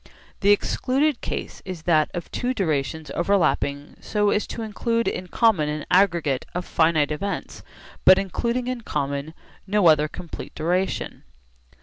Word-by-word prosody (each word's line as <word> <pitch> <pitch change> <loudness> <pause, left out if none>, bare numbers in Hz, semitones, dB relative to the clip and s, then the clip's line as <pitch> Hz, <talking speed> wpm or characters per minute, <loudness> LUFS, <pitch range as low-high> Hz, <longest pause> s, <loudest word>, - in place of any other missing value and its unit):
The 200 - +2
excluded 260 +7 +2
case - - -5
is 185 -4 -7
that 155 -3 +3
of 175 - -6
two 255 +1 -2
durations 155 - -1
overlapping 165 -6 0
so 210 -1 +1
as 210 - 0
to 230 - -5
include 230 +2 -1
in 180 - -3
common 190 -7 +2
an 150 0 -4
aggregate 170 -8 +3
of 180 - -2
finite 160 -2 +2
events 200 +7 -4 0.4
but 185 - +8
including 235 +6 -1
in 250 -1 -3
common 140 -3 -3 0.3
no 205 -1 +2
other 155 -2 +5
complete 165 +2 -9
duration. 180 +4 -1
180 Hz, 140 wpm, -24 LUFS, 155-210 Hz, 0.4 s, but